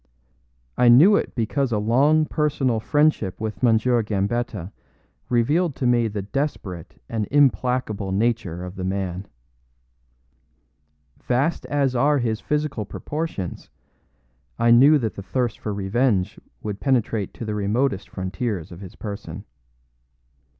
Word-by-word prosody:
I 125 -1 +6
knew 160 - +7
it - - -1
because 125 +3 -1
a 110 - +1
long 140 +9 +3
personal 140 -7 0
friendship 145 - +1
with 110 -2 -5
M. 115 -3 +5
Gambetta 110 -3 -1 0.6
revealed 145 +7 +1
to 130 - -3
me 120 -2 +3
the 105 -2 -4
desperate 100 - -4
and 110 -3 -2
implacable 125 -6 +1
nature 100 -4 -1
of 90 +2 -9
the 95 - -4
man. 95 0 -3 1.9
Vast 135 +7 -1
as 140 -3 0
are 145 +4 +3
his 115 -4 -1
physical 150 -6 -1
proportions, 145 - -5 0.9
I 115 0 +3
knew 140 +6 +7
that 115 -6 -2
the - - -7
thirst 120 +4 -2
for 105 - -4
revenge 100 0 0 0.2
would 105 -2 -4
penetrate 115 -6 0
to 115 - -6
the 105 - -3
remotest 105 +1 -1
frontiers 95 -1 -4
of 85 - -10
his 95 - -10
person. 100 -3 -7
115 Hz, 130 wpm, -23 LUFS, 100-135 Hz, 1.9 s, knew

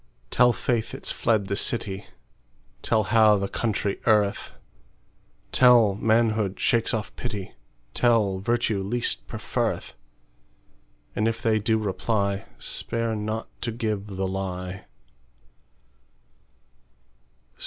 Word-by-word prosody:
Tell 125 0 +5
faith 120 -1 -1
it's - - -4
fled 110 -3 +1
the 100 - -2
city; 100 -2 -2 0.7
Tell 110 -2 +2
how 110 0 +5
the 100 0 -1
country 105 -2 -2
erreth; 105 -3 +2 1.0
Tell, 120 -5 +6
manhood 110 -1 +1
shakes 115 -2 +2
off 110 -2 -3
pity; 105 -6 -5 0.4
Tell, 110 -6 +2
virtue 115 -1 0
least 95 - -1
preferreth:And - - -6
if 115 0 -1
they 110 -1 +3
do 110 +2 +1
reply, 100 -1 -1
Spare 115 -1 -2
not 110 +1 -3
to 115 - -2
give 110 -3 -3
the 95 -1 -3
lie. 95 0 -4
105 Hz, 100 wpm, -25 LUFS, 95-115 Hz, 1.0 s, Tell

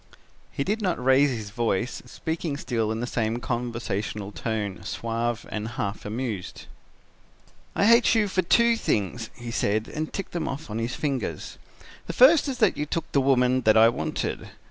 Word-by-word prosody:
"He 140 - -2
did 215 +7 -1
not 185 -4 0
raise 135 +2 +5
his 110 -5 -5
voice, 115 +1 -1
speaking 160 +2 -3
still 115 -6 -1
in 110 +1 -3
the - - -1
same 115 -1 -1
conversational 115 -4 -3
tone, 105 -3 -3
suave 115 0 -2
and 105 0 -3
half 105 -3 -4
amused. 110 -3 -4 1.1
"'I - - +3
hate 235 +2 +6
you 215 -2 +3
for 190 -1 +1
two 235 +6 +4
things,' 110 - -1
he 120 -1 -7
said, 110 0 0
and 155 0 -4
ticked 195 - -5
them 170 -2 -2
off 140 -3 -5
on 110 - -2
his 115 +2 -2
fingers: 135 -6 -3 0.5
'the - - -3
first 290 +5 +6
is 265 -2 -2
that 215 -5 +3
you 150 - -2
took 165 - -3
the 140 - +3
woman 130 -1 +3
that 110 -2 +4
I 115 +1 +8
wanted. 120 - -3
120 Hz, 175 wpm, -26 LUFS, 110-155 Hz, 1.1 s, I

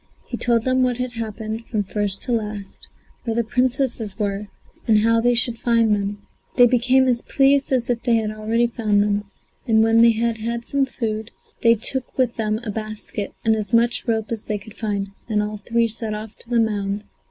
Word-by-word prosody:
He - - -5
told 235 -2 +1
them 255 +1 +2
what 250 -2 +1
had 250 0 -3
happened 220 -1 -5
from 215 -3 -1
first 200 0 -2
to - - -3
last, 210 -3 -4 0.4
where 230 -2 -2
the 235 - +2
Princesses 245 -2 0
were 205 -1 -2 0.4
and 215 -2 +5
how 230 +1 +3
they 245 +1 +3
should 235 -1 +2
find 230 -2 +3
them. 205 0 -3 0.3
They 245 - +8
became 255 +2 +3
as 240 -2 +2
pleased 275 0 +2
as 255 -3 +1
if 240 -1 -1
they 240 -2 +2
had 220 -1 0
already 220 +2 0
found 215 -4 +1
them, 205 0 0 0.4
and 220 -1 +4
when 225 +1 +4
they 230 0 +7
had 230 0 0
had 235 +1 -3
some 280 -1 +1
food, 220 -4 -4 0.3
they 230 0 +5
took 255 +3 -2
with 255 -3 +1
them 215 -1 -1
a 220 - -3
basket 215 -1 -5
and 220 0 +4
as 210 -1 -4
much 235 +1 +2
rope 220 -1 -1
as 225 -2 -2
they 210 -1 -3
could 220 +2 -13
find, 200 -3 -2 0.2
and 210 -1 +1
all 210 0 -4
three 230 +3 +1
set 225 -1 -4
off 215 +1 -7
to 235 - -17
the 240 -1 +2
mound. 205 -2 -1
225 Hz, 210 wpm, -22 LUFS, 210-240 Hz, 0.4 s, They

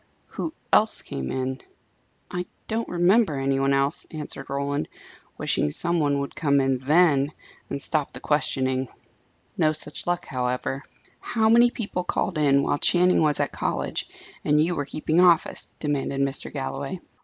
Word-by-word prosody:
"Who - - -5 0.2
else - - +4
came 65 -1 -5
in?" 130 0 -2 0.7
"I 180 0 -3 0.2
don't 225 +1 -2
remember 175 -2 +3
any 135 0 +1
one 135 0 +2
else," 140 +1 +1
answered 150 -3 -6
Roland, 140 +1 -2 0.5
wishing - - +1
some 170 - -1
one 145 -2 +2
would 140 - -5
come 140 -2 +2
in 135 -1 +1
then, 145 0 +3 0.4
and - - -3
stop 150 0 0
the - - -8
questioning. 130 -3 +1 0.7
No 155 -1 +3
such 150 +1 -7
luck, 175 0 0
however. 125 +1 -2 0.4
"How 220 -1 +1
many 235 +2 +6
people 205 -6 -3
called 175 -1 -1
in, 140 -2 +4
while 145 - 0
Channing 180 +2 +4
was 150 -2 +3
at - - 0
college, - - -2 0.4
and 150 0 +3
you 165 +3 +2
were 145 -4 -2
keeping 155 +3 0
office?" 175 -2 +3
demanded 140 -2 -1
Mr. 135 0 -1
Galloway. 135 +4 -4
145 Hz, 155 wpm, -25 LUFS, 135-175 Hz, 0.7 s, many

